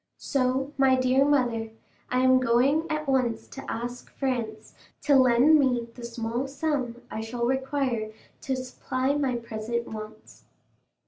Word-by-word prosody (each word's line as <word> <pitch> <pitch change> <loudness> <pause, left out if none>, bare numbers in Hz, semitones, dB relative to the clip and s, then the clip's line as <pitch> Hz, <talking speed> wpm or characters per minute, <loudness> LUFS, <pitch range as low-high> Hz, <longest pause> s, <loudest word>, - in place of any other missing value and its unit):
So, 265 +1 -1
my 265 -1 +5
dear 255 +1 +3
mother, 245 -6 +1 0.4
I 255 0 +1
am 260 0 +5
going 255 +6 +2
at 305 -1 -2
once 255 -4 0
to 270 - -7
ask 245 +2 -5
Franz 230 -5 -3 0.3
to 285 - +4
lend 260 +4 +6
me 245 -4 +1
the 240 - -11
small 235 +2 -3
sum 270 -4 -2
I 220 - -4
shall 235 +2 -3
require 265 -4 -1 0.3
to 265 -2 -1
supply 255 +1 -2
my 275 -4 0
present 235 0 -4
wants." 215 0 -10
255 Hz, 140 wpm, -26 LUFS, 235-270 Hz, 0.4 s, lend